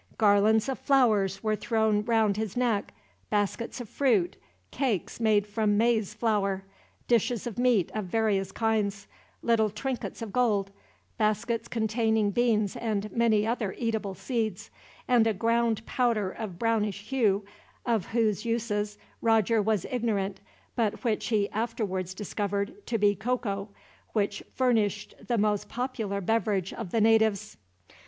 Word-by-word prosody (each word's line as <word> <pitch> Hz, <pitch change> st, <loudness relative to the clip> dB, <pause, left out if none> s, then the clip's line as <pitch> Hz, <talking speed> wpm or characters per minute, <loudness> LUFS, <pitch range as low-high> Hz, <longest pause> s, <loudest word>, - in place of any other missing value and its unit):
Garlands 215 Hz, +2 st, +4 dB
of 265 Hz, -, -3 dB
flowers 210 Hz, -8 st, +2 dB
were 215 Hz, -1 st, +1 dB
thrown 220 Hz, -2 st, +1 dB
round 220 Hz, -3 st, +2 dB
his 215 Hz, 0 st, -3 dB
neck, 235 Hz, -5 st, 0 dB, 0.4 s
baskets 210 Hz, +4 st, -1 dB
of 245 Hz, -, -6 dB
fruit, 210 Hz, -9 st, +1 dB, 0.4 s
cakes 225 Hz, -7 st, -1 dB
made 215 Hz, -3 st, +3 dB
from 210 Hz, 0 st, +1 dB
maize 220 Hz, -2 st, +1 dB
flour, 205 Hz, -4 st, 0 dB, 0.4 s
dishes 235 Hz, -1 st, +1 dB
of 240 Hz, -2 st, -5 dB
meat 245 Hz, -7 st, +3 dB
of 215 Hz, -2 st, -2 dB
various 195 Hz, -1 st, 0 dB
kinds, 210 Hz, -2 st, 0 dB, 0.4 s
little 225 Hz, -2 st, +3 dB
trinkets 240 Hz, +2 st, -4 dB
of 210 Hz, -4 st, -7 dB
gold, 210 Hz, -6 st, +1 dB, 0.5 s
baskets 220 Hz, +2 st, 0 dB
containing 220 Hz, -2 st, +1 dB
beans 215 Hz, -3 st, +1 dB
and 215 Hz, -2 st, -2 dB
many 225 Hz, -3 st, +2 dB
other 225 Hz, -4 st, -1 dB
eatable 220 Hz, -4 st, -2 dB
seeds, 220 Hz, -6 st, -3 dB, 0.4 s
and 240 Hz, -3 st, +4 dB
a 220 Hz, -, +1 dB
ground 230 Hz, +1 st, +1 dB
powder 230 Hz, -6 st, +1 dB
of 200 Hz, -5 st, -6 dB
brownish 210 Hz, -2 st, 0 dB
hue, 210 Hz, -7 st, +2 dB, 0.4 s
of 230 Hz, -6 st, 0 dB
whose 215 Hz, -3 st, +1 dB
uses 210 Hz, -3 st, -1 dB, 0.2 s
Roger 225 Hz, -1 st, +3 dB
was 210 Hz, -3 st, 0 dB
ignorant, 205 Hz, -6 st, -1 dB, 0.4 s
but 225 Hz, -2 st, -1 dB
which 225 Hz, -4 st, 0 dB
he 210 Hz, -4 st, +2 dB
afterwards 200 Hz, -5 st, -2 dB
discovered 200 Hz, -, -2 dB
to 230 Hz, -, 0 dB
be 205 Hz, -1 st, +4 dB
cocoa, 215 Hz, -2 st, -2 dB, 0.4 s
which 205 Hz, -2 st, 0 dB
furnished 220 Hz, -5 st, +1 dB
the 240 Hz, -, +1 dB
most 210 Hz, -1 st, +1 dB
popular 230 Hz, -6 st, -3 dB
beverage 205 Hz, -2 st, 0 dB
of 220 Hz, -6 st, -6 dB
the 225 Hz, +4 st, +1 dB
natives. 220 Hz, -2 st, +3 dB
220 Hz, 135 wpm, -28 LUFS, 205-230 Hz, 0.5 s, Garlands